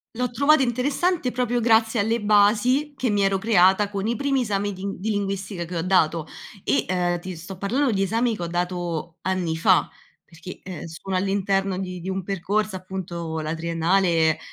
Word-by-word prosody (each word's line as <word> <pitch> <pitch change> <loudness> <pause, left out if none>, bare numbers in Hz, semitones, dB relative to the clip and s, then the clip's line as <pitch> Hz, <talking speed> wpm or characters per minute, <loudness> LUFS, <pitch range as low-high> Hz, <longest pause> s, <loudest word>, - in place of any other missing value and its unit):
L'ho 250 0 -1
trovato 280 +3 +4
interessante, 270 +4 0
proprio 245 -1 0
grazie 225 0 +3
alle 225 +2 +1
basi 215 +8 +3
che 255 -3 -1
mi 205 -1 +2
ero 195 0 +2
creata 195 -1 +4
con 200 0 -3
i 235 - 0
primi 275 -1 0
esami 205 -1 -1
di 195 +1 -5
di 215 +4 -3
linguistica 195 -3 -3
che 175 - -7
ho - - 0
dato. 165 -3 +2 0.4
E, 135 0 +1
ehm, 175 -1 0
ti 180 0 -7
sto 180 +4 -9
parlando 245 +7 0
di 195 - 0
esami 230 +3 0
che 180 - -9
ho - - -2
dato 175 -1 -3
anni 180 -4 -1
fa 185 +2 +4 0.4
perché, 170 +2 -11
ehm, 180 -4 -7
sono 175 +4 -6
all'interno 195 0 0
di 180 -1 -5
di 185 +3 -6
un 190 -1 -3
percorso 195 +2 -1
appunto, 175 -3 -5
la 155 +1 -3
triennale, 165 0 +1
195 Hz, 180 wpm, -24 LUFS, 175-220 Hz, 0.4 s, trovato